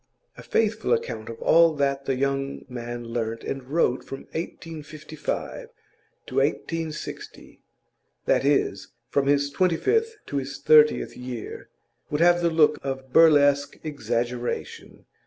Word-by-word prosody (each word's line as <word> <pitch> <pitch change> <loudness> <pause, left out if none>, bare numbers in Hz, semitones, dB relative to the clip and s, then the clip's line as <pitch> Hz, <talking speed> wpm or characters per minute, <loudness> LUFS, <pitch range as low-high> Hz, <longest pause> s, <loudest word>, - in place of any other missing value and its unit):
A - - -11
faithful 220 0 +1
account 115 -2 -3
of 115 - -8
all 165 -1 +5
that 140 -1 0
the 135 - 0
young 135 +1 -2
man 120 -1 -6
learnt 115 -1 -3
and 135 - -4
wrote 130 -2 0
from 135 - -8
1855 155 - -6 0.6
to - - -9
1860 165 -2 -3 0.6
that - - +2
is, 120 -9 +1 0.2
from 140 -1 +1
his 140 0 +2
twenty 180 +1 +2
fifth 450 - +1
to 140 - -4
his 135 0 -4
thirtieth 150 -1 +4
year 125 -2 -7 0.4
would 150 - -1
have 175 +1 +5
the 170 - +3
look 155 -2 +3
of 135 -1 -5
burlesque 145 -3 +5
exaggeration. 120 -4 -4
140 Hz, 130 wpm, -25 LUFS, 125-160 Hz, 0.6 s, all